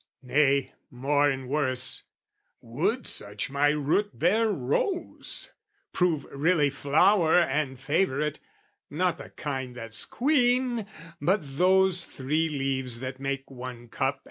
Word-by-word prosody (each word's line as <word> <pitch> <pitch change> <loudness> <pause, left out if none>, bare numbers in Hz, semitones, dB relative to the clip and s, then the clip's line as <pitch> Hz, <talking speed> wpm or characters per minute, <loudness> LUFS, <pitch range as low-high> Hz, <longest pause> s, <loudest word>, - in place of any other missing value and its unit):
Nay, 140 +1 +2 0.2
more 145 +3 +2
and 135 -2 -3
worse, 130 -2 0 0.6
would 185 - -2
such 105 +5 -1
my 140 +1 +3
root 150 - 0
bear 200 - +3
rose 325 - -2 0.4
Prove 175 -5 +1
really 150 0 +2
flower 160 +5 +3
and 140 -5 0
favourite, 150 -1 0 0.5
not 170 +1 0
the 140 - -9
kind 130 -4 -5
That's 115 -3 -2
queen, 245 -4 +1 0.3
but 185 +7 +2 0.2
those 185 0 +4
three 155 +5 -1
leaves 135 -4 -1
that 130 0 -5
make 135 0 -4
one 125 -2 -8
cup. 135 +3 -1
145 Hz, 115 wpm, -27 LUFS, 130-180 Hz, 0.6 s, those